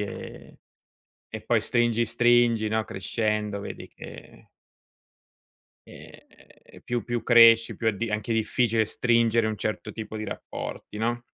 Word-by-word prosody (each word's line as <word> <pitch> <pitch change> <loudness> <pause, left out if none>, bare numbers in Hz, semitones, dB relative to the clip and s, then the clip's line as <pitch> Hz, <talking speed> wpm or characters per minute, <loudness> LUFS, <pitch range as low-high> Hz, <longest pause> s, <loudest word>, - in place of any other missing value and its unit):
e 105 - -8 0.7
e - - -7
poi - - +1
stringi 120 -1 +1
stringi, 120 -1 +3
no, 110 0 -1
crescendo, 105 +1 -2
vedi - - -8
che - - -13 1.4
Ehm, - - -17
più 120 -1 -2
più 120 0 -3
cresci, 115 -1 +6
più 115 - -5
è 110 - +2
di 115 +2 -4
anche 105 +2 -3
difficile 110 0 +1
stringere 115 0 +1
un 110 -1 -2
certo 105 +2 -4
tipo 110 -1 -7
di 110 - -4
rapporti, 105 - -7
no? 120 +2 -1
115 Hz, 130 wpm, -25 LUFS, 110-120 Hz, 1.4 s, cresci